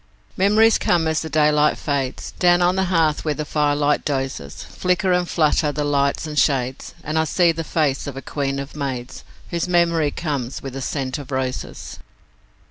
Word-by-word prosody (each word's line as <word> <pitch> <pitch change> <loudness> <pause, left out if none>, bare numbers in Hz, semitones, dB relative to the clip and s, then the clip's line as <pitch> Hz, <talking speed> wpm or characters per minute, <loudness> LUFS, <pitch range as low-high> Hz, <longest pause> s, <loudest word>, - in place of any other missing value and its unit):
Memories 210 +3 +4
come 170 -2 +2
as 160 -1 0
the 160 - -5
daylight 150 0 +3
fades 140 -3 -3
Down 175 -1 +4
on 180 +1 +3
the 190 0 +1
hearth 165 -4 +1
where 150 -2 -1
the 150 - -4
firelight 145 -1 +1
dozes; 135 - -3
Flicker 180 +1 0
and 180 -1 0
flutter 150 -2 +2
the 145 +1 -2
lights 140 0 +1
and 150 -1 -1
shades, 130 -2 0
And 155 +1 -1
I - - +3
see 175 +1 +3
the 165 0 -4
face 150 -4 0
of 135 -2 -6
a - - -5
queen 140 0 -2
of 140 +2 -6
maids 130 -4 -5 0.3
Whose 170 0 -1
memory 170 -3 +2
comes 140 -5 -4
with 135 -2 -6
the 135 - -5
scent 135 0 -3
of 140 - -10
roses. 130 -1 -4
150 Hz, 185 wpm, -21 LUFS, 140-170 Hz, 0.3 s, Memories